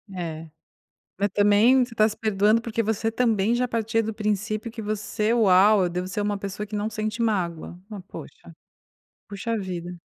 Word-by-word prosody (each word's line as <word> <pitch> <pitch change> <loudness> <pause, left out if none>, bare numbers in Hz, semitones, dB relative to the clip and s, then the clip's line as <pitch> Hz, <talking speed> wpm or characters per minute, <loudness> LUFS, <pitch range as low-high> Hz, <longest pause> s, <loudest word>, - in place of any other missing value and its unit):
É, 165 -2 -5 0.7
mas 205 - +1
também 210 +6 +4
você 240 -1 -12
tá 215 -1 +5
se 215 - -7
perdoando 215 +1 +2
porque 230 0 -3
você 225 +1 -1
também 225 -2 +1
já 250 - +1
partia 225 -1 0
do 220 0 -4
princípio 215 +2 -2
que 225 0 -8
você 215 +1 -1
"Uau, 205 -2 +5
eu - - +1
devo 180 +1 -3
ser 205 +3 -4
uma 205 0 -1
pessoa 200 +1 -5
que 210 0 -5
não 205 +1 -1
sente 215 +1 -4
mágoa". 175 -7 -1
Mas 205 -3 -7
puxa. - - -11 0.8
Puxa 215 +3 -3
vida. 180 -3 -5
210 Hz, 180 wpm, -24 LUFS, 195-225 Hz, 0.8 s, tá